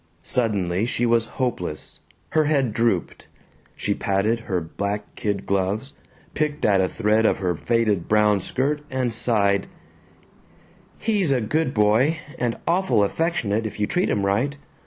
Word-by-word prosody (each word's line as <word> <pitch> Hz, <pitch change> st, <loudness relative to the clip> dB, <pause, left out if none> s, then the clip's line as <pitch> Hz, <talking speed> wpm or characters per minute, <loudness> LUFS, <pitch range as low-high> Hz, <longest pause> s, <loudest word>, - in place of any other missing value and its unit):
Suddenly 100 Hz, -4 st, 0 dB
she 120 Hz, 0 st, 0 dB
was 115 Hz, -1 st, +2 dB
hopeless. 90 Hz, -, -3 dB, 0.3 s
Her 155 Hz, -1 st, +2 dB
head 140 Hz, -7 st, +1 dB
drooped. 115 Hz, -6 st, -1 dB, 0.5 s
She 100 Hz, -, -1 dB
patted 100 Hz, +4 st, 0 dB
her 95 Hz, -5 st, -2 dB
black 100 Hz, +5 st, -4 dB
kid 100 Hz, -2 st, -2 dB
gloves, 100 Hz, +8 st, -1 dB, 0.4 s
picked 150 Hz, -1 st, -1 dB
at 100 Hz, -3 st, +4 dB
a 95 Hz, -, +1 dB
thread 110 Hz, 0 st, +2 dB
of -, -, +3 dB
her 90 Hz, -2 st, 0 dB
faded 105 Hz, 0 st, 0 dB
brown 105 Hz, -1 st, +3 dB
skirt, 140 Hz, +9 st, -1 dB
and 130 Hz, -3 st, -1 dB
sighed, 100 Hz, -4 st, +1 dB, 1.3 s
"He's 205 Hz, -7 st, +1 dB
a 130 Hz, -, +3 dB
good 130 Hz, +4 st, -1 dB
boy, 110 Hz, +9 st, +3 dB, 0.2 s
and 120 Hz, -2 st, -1 dB
awful 175 Hz, -, +3 dB
affectionate 115 Hz, -, 0 dB
if 105 Hz, -, -9 dB
you 105 Hz, -, +2 dB
treat 180 Hz, -, 0 dB
him 100 Hz, -2 st, 0 dB
right. 120 Hz, +9 st, 0 dB
110 Hz, 145 wpm, -23 LUFS, 100-130 Hz, 1.3 s, at